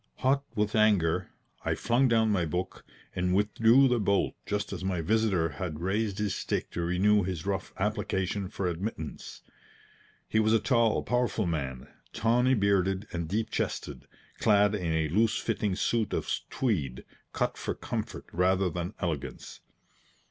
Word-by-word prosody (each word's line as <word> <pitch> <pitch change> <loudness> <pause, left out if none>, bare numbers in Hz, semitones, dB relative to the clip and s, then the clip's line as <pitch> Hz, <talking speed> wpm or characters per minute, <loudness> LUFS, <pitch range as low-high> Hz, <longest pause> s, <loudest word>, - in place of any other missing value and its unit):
Hot 135 +1 +3
with 105 +1 0
anger, 105 -7 +3 0.3
I - - 0
flung 120 +3 +2
down 110 -2 +3
my 95 -4 +2
book 90 +4 -3 0.3
and 90 0 +1
withdrew 115 +6 +5
the 125 -2 +2
bolt 100 -1 +1
just 105 0 -2
as - - -5
my 95 -2 -1
visitor 95 -2 +1
had 75 +1 -5
raised 100 +3 -1
his 105 -1 -1
stick - - -3
to 85 - -3
renew 95 +5 +3
his 90 -3 -4
rough 100 0 -2
application 100 -1 -1
for 100 -2 -4
admittance. 85 -2 -5 0.8
He 110 - +1
was 110 0 +3
a 115 - +5
tall, 115 0 +2
powerful 120 -3 0
man, 70 -7 -3 0.3
tawny 120 +3 +3
bearded 100 -1 +1
and 85 -2 -3
deep 110 +3 -1
chested, - - -3 0.3
clad 105 -1 +4
in 90 -5 -1
a 80 -1 +1
loose 110 +7 +2
fitting 105 -4 -1
suit 110 +1 0
of - - -2 0.2
tweed, 75 - -1 0.3
cut - - -1
for - - -4
comfort - - -5
rather 90 +1 +2
than 90 +5 -4
elegance. 80 -7 -4
100 Hz, 155 wpm, -29 LUFS, 90-110 Hz, 0.8 s, withdrew